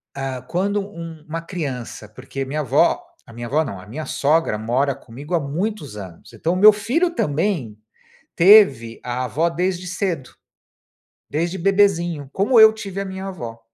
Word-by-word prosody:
eh, -, -, -7 dB
ah, 130 Hz, -2 st, -4 dB
quando 200 Hz, +8 st, -1 dB
um 165 Hz, -5 st, -9 dB
uma 165 Hz, +2 st, -4 dB
criança, 140 Hz, -, -6 dB
porque 135 Hz, +1 st, -6 dB
minha 150 Hz, +3 st, -3 dB
avó, 135 Hz, -, +2 dB, 0.2 s
a 115 Hz, -, -14 dB
minha 120 Hz, +1 st, -6 dB
avó 150 Hz, +6 st, +1 dB
não, 100 Hz, -10 st, -6 dB
a 95 Hz, -, -13 dB
minha 150 Hz, +8 st, -6 dB
sogra 150 Hz, -6 st, +1 dB
mora 130 Hz, +5 st, 0 dB
comigo 140 Hz, +8 st, -10 dB
há 170 Hz, -, +3 dB
muitos 150 Hz, -, -4 dB
anos, 95 Hz, -5 st, -11 dB
então 165 Hz, +2 st, -1 dB
o -, -, -1 dB
meu 210 Hz, +2 st, +9 dB
filho 250 Hz, -, 0 dB
também 150 Hz, -, -1 dB, 0.6 s
teve 165 Hz, -, +6 dB
a 125 Hz, +1 st, -3 dB
avó 150 Hz, +8 st, 0 dB
desde 180 Hz, +1 st, -2 dB
cedo. 170 Hz, -9 st, -3 dB, 1.0 s
Desde 170 Hz, +5 st, -1 dB
bebezinho, 175 Hz, -6 st, +2 dB
como 220 Hz, +5 st, +3 dB
eu 220 Hz, 0 st, +9 dB
tive 195 Hz, -3 st, -6 dB
a -, -, -4 dB
minha 190 Hz, 0 st, -6 dB
avó. 120 Hz, -12 st, -7 dB
160 Hz, 170 wpm, -21 LUFS, 130-190 Hz, 1.0 s, meu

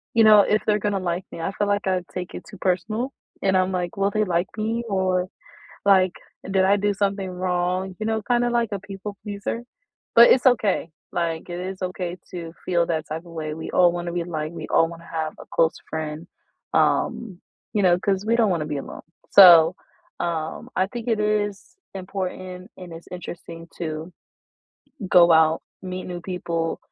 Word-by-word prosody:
you 225 Hz, -, +6 dB
know, 215 Hz, -1 st, +8 dB
if 210 Hz, +2 st, +2 dB
they're 210 Hz, 0 st, +4 dB
gonna 205 Hz, -1 st, -1 dB
like 175 Hz, 0 st, -2 dB
me, 165 Hz, -, -7 dB
I 190 Hz, -, -2 dB
feel 205 Hz, -, 0 dB
like 205 Hz, -1 st, 0 dB
I 185 Hz, -1 st, +1 dB
take 180 Hz, -1 st, -5 dB
it -, -, -7 dB
too 205 Hz, -, -11 dB
personal 215 Hz, +8 st, -1 dB, 0.3 s
and 190 Hz, -1 st, +3 dB
I'm, 185 Hz, 0 st, +1 dB
like, 180 Hz, 0 st, -3 dB
"Will 200 Hz, +1 st, +1 dB
they 215 Hz, +1 st, +1 dB
like 175 Hz, -1 st, +1 dB
me?" 225 Hz, +2 st, -1 dB
or 185 Hz, -2 st, 0 dB, 0.6 s
like, 190 Hz, -2 st, +5 dB, 0.4 s
"Did 190 Hz, -1 st, +3 dB
I 200 Hz, -, +5 dB
do 205 Hz, 0 st, +1 dB
something 200 Hz, -1 st, -1 dB
wrong?" 180 Hz, +1 st, -1 dB
You 215 Hz, -, -3 dB
know, 220 Hz, 0 st, 0 dB
kind 240 Hz, +3 st, +1 dB
of 240 Hz, -, 0 dB
like 235 Hz, -2 st, +1 dB
a 200 Hz, -, -2 dB
people 200 Hz, 0 st, -8 dB
pleaser, 205 Hz, +3 st, -4 dB, 0.5 s
but 235 Hz, +1 st, +9 dB
it's 260 Hz, -, +4 dB
okay. 215 Hz, -9 st, +2 dB, 0.2 s
Like, 165 Hz, 0 st, -2 dB
it 175 Hz, -, -4 dB
is 185 Hz, +1 st, -6 dB
okay 180 Hz, -1 st, -3 dB, 0.2 s
to 170 Hz, -2 st, -7 dB
feel 170 Hz, -2 st, +2 dB
that 160 Hz, -2 st, -2 dB
type 160 Hz, +3 st, -5 dB
of 170 Hz, -, -13 dB
way. 155 Hz, -2 st, -4 dB
We 160 Hz, -, -6 dB
all 175 Hz, -1 st, +5 dB
want 175 Hz, 0 st, -4 dB
to 170 Hz, -, -3 dB
be 175 Hz, -, -1 dB
liked; 155 Hz, -2 st, -4 dB
we 160 Hz, -2 st, -7 dB
all 165 Hz, -, +4 dB
want 170 Hz, 0 st, -10 dB
to -, -, -15 dB
have 160 Hz, -1 st, -3 dB
a -, -, -10 dB
close 165 Hz, -1 st, +2 dB
friend. 155 Hz, +1 st, -5 dB, 0.5 s
Um, 200 Hz, -6 st, +1 dB, 0.3 s
you 210 Hz, -, +2 dB
know, 175 Hz, -1 st, +5 dB
'cause 195 Hz, 0 st, 0 dB
we 230 Hz, +1 st, +2 dB
don't 225 Hz, -4 st, +3 dB
want 170 Hz, -3 st, 0 dB
to 150 Hz, -, -3 dB
be 150 Hz, -1 st, -3 dB
alone. 140 Hz, -, -7 dB, 0.3 s
So, 175 Hz, -3 st, +9 dB, 0.5 s
um, 160 Hz, -2 st, -3 dB
I 185 Hz, -, +2 dB
think 235 Hz, +2 st, -7 dB
it 225 Hz, -3 st, +1 dB
is 210 Hz, -1 st, -1 dB, 0.2 s
important, 185 Hz, -1 st, -5 dB
and 180 Hz, -2 st, -9 dB
it's 165 Hz, +1 st, -11 dB
interesting 170 Hz, -2 st, -8 dB
to 160 Hz, +1 st, -5 dB, 1.0 s
go 170 Hz, -1 st, +7 dB
out, 160 Hz, 0 st, +4 dB, 0.2 s
meet 185 Hz, 0 st, -5 dB
new 175 Hz, -1 st, -5 dB
people 170 Hz, -2 st, -3 dB
185 Hz, 200 wpm, -23 LUFS, 170-200 Hz, 1.0 s, but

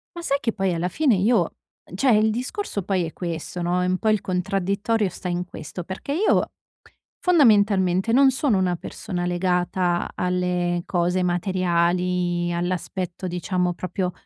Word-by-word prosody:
Ma 345 Hz, -, -6 dB
sai 280 Hz, -4 st, +1 dB
che 230 Hz, -5 st, -1 dB
poi 195 Hz, -2 st, 0 dB
alla 170 Hz, +2 st, -1 dB
fine 275 Hz, -, +2 dB
io, 215 Hz, +4 st, +3 dB, 0.5 s
uhm, -, -, -11 dB
cioè 255 Hz, +7 st, +3 dB
il 215 Hz, +1 st, +3 dB
discorso 245 Hz, -, -3 dB
poi 185 Hz, -1 st, 0 dB
è 160 Hz, -, -7 dB
questo, 170 Hz, 0 st, -4 dB
no, 180 Hz, +1 st, +1 dB
è 180 Hz, -, 0 dB
un 185 Hz, -, +1 dB
po' 220 Hz, -, 0 dB
il 215 Hz, -1 st, +2 dB
contraddittorio 195 Hz, +3 st, 0 dB
sta 180 Hz, -, -7 dB
in 175 Hz, 0 st, -1 dB
questo. 175 Hz, 0 st, -8 dB
Perché 190 Hz, +10 st, -5 dB
io 380 Hz, +8 st, +2 dB, 0.7 s
fondamentalmente 205 Hz, -, +3 dB
non 270 Hz, +2 st, +6 dB
sono 260 Hz, -5 st, +1 dB
una 180 Hz, -1 st, +1 dB
persona 175 Hz, +1 st, -5 dB
legata 180 Hz, 0 st, 0 dB
alle 180 Hz, -1 st, 0 dB
cose 180 Hz, +1 st, 0 dB
materiali, 175 Hz, -1 st, 0 dB
all'aspetto 180 Hz, +1 st, -3 dB
diciamo 180 Hz, 0 st, -1 dB
proprio, 180 Hz, +1 st, -3 dB
180 Hz, 155 wpm, -23 LUFS, 175-205 Hz, 0.7 s, non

